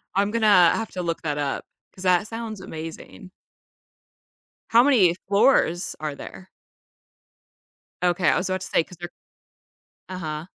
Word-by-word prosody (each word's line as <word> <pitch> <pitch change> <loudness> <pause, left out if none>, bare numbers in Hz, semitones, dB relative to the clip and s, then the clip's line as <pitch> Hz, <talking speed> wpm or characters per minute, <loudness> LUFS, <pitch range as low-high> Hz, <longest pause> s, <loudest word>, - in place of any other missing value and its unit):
I'm 200 +1 +1
gonna 210 -7 +5
have 225 - -4
to 185 - -4
look 165 -1 -3
that 150 -2 -2
up, 145 -2 -3 0.3
'cause 185 - -10
that 185 +2 +2
sounds 225 -3 -6
amazing. 165 +3 -9 1.4
How 235 +1 +6
many 215 -11 +4
floors 200 -4 +2
are 155 -1 -3
there? 185 +6 -11 1.5
Okay, 175 -1 +2
I - - +2
was 185 +1 -2
about 185 0 -2
to - - -6
say, - - +2
'cause 180 - -15
they're 175 0 -6 1.0
Uh-huh. 160 -4 -5
185 Hz, 140 wpm, -24 LUFS, 165-205 Hz, 1.5 s, How